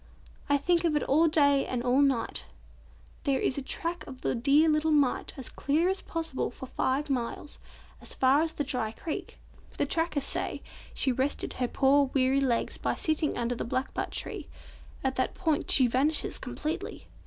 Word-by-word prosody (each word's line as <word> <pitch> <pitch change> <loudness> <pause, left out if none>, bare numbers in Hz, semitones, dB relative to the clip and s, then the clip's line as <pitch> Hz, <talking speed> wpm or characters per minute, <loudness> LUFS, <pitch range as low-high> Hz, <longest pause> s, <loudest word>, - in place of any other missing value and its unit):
"I 285 - +4
think 340 +4 +1
of 325 -3 +2
it 295 - +1
all 315 +4 +4
day 285 -3 +3
and 245 -2 -2
all 255 +3 +3
night. 265 -5 0 0.8
There 275 -2 +1
is 260 - 0
the - - -1
track 335 +6 -3
of 260 -2 -9
the - - 0
dear 280 +6 +4
little 305 0 +2
mite 290 -4 +1
as 265 - -6
clear 315 +6 +1
as 380 0 -1
possible 325 -5 -2
for 265 - -9
five 265 +3 -1
miles, 265 +2 -3 0.4
as - - -6
far 265 +3 +4
as 320 0 -1
the 290 - -2
dry 250 -5 -1
creek. 310 +6 -6 0.4
The - - +1
trackers 325 -4 0
say - - -3 0.3
she 265 - +4
rested 265 +3 -1
her 250 - -1
poor 275 +3 +3
weary 265 +1 +3
legs 245 -4 0
by - - -1
sitting 310 -1 0
under 240 0 -1
the 240 - -4
blackbutt 255 +3 -2
tree. - - -4 0.6
At 265 -1 -1
that 260 - 0
point 320 -5 0
she 260 - +7
vanishes 270 +6 +1
completely. 305 +5 -5
280 Hz, 180 wpm, -29 LUFS, 260-305 Hz, 0.8 s, she